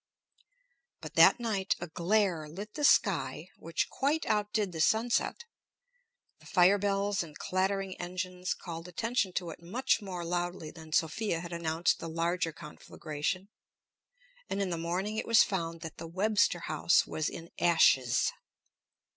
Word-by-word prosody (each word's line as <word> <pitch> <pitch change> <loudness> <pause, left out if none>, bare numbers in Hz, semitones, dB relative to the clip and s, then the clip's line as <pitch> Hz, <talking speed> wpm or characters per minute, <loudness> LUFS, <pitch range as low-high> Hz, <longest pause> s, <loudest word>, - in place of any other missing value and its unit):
But - - -9
that - - +7
night 205 -5 0
a 175 - -4
glare 175 -1 0
lit 205 +7 -8
the 295 - -4
sky 165 - +2
which 165 0 -2
quite 295 +4 0
outdid 210 -1 0
the 160 -2 -3
sunset; 230 - +1 0.9
the - - -17
fire 190 +1 +5
bells 200 0 0
and 155 -3 -8
clattering 190 0 -1
engines 180 0 -3
called 165 -1 -8
attention 220 +2 -1
to 175 -2 -3
it 160 - -12
much 230 +8 0
more 180 -4 -5
loudly 175 -2 -3
than 160 -2 -13
Sophia 165 +3 0
had 170 0 -7
announced 165 0 0
the 165 - -6
larger 165 +1 -1
conflagration. 155 +3 -5 1.0
And 195 - -2
in 195 -2 -1
the - - 0
morning 180 +6 -2
it - - -3
was 230 -1 +7
found 165 -4 -3
that 160 -1 -8
the 165 - -7
Webster 190 0 +1
House 155 +2 +2
was 155 - -2
in 170 0 -9
ashes. 130 -7 +4
180 Hz, 145 wpm, -30 LUFS, 165-200 Hz, 1.0 s, that